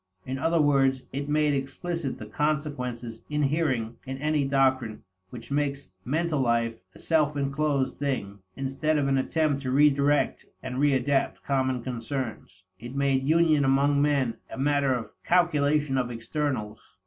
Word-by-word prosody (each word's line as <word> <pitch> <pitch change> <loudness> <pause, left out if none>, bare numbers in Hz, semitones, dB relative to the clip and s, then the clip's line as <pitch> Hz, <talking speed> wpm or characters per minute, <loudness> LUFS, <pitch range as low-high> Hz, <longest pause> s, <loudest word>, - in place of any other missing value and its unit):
In 130 +1 -4
other 165 +3 +2
words, 135 -3 +3
it 140 +2 -3
made 150 0 +2
explicit 140 +2 -3
the 110 - -8
consequences 125 -3 -2
inhering 140 -6 0
in 135 0 -5
any 150 +1 +1
doctrine 130 -5 +1 0.3
which 120 +4 -10
makes 140 -5 -1
mental 155 - 0
life 115 -2 +1 0.2
a - - -12
self 150 -3 +1
inclosed 140 0 0
thing, 125 -8 -2 0.2
instead 135 +3 -1
of 140 -2 +1
an 135 -1 +2
attempt 145 0 0
to 130 - -3
redirect 145 +1 +3 0.2
and 125 - -4
readapt 135 -1 +1
common 130 -3 0
concerns. 120 -6 -5 0.2
It 120 +4 -8
made 135 -1 +1
union 160 -3 +4
among 140 +1 +3
men 140 -5 +1
a - - -8
matter 140 0 +2
of 120 -2 -5
calculation 150 -5 +2
of 125 -1 -1
externals. 115 -2 -3
140 Hz, 145 wpm, -27 LUFS, 130-150 Hz, 0.3 s, union